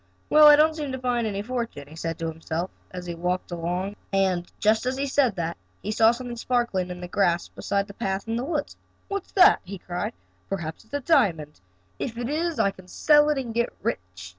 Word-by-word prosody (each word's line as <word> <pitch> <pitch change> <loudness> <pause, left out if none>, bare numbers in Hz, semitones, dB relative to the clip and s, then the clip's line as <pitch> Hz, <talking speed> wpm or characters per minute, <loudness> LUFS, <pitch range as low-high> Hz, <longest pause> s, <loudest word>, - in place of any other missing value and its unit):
"Well, 305 0 +9
I 295 - +10
don't 310 +1 +4
seem 295 -3 -4
to - - -2
find 245 -3 0
any 200 -1 -3
fortune," 235 - -4
he 155 - -13
said 165 0 -4
to 165 - -3
himself 160 +2 -4 0.2
as 180 -1 -7
he 175 - -4
walked 180 +2 -2
along, 175 +4 -2 0.2
and, 190 -3 +1
just 220 +3 +2
as 260 +1 -1
he 275 - 0
said 265 -6 +2
that 170 -1 -3 0.3
he 210 - -2
saw 220 +1 +5
something 240 0 -3
sparkling 235 -7 0
in 180 0 -7
the 180 - -5
grass 175 -2 +1
beside 200 -1 -1
the 200 - -11
path 195 -1 -3
in 225 - -1
the 240 - -1
woods. 295 0 -2 0.3
"What's 395 -1 -4
that?" 375 -2 +7
he 195 +2 -7
cried. 180 +5 -4 0.4
"Perhaps 170 0 -4
it - - -26
is - - -31
a 285 - -1
diamond. 190 - +2 0.4
If 230 -3 -4
it 240 +1 -3
is 325 +2 -1
I 200 - +3
can 185 -1 -16
sell 295 +8 +4
it 300 - +1
and 245 -4 -3
get 235 +1 0
rich." 90 - -4
205 Hz, 225 wpm, -25 LUFS, 180-255 Hz, 0.4 s, I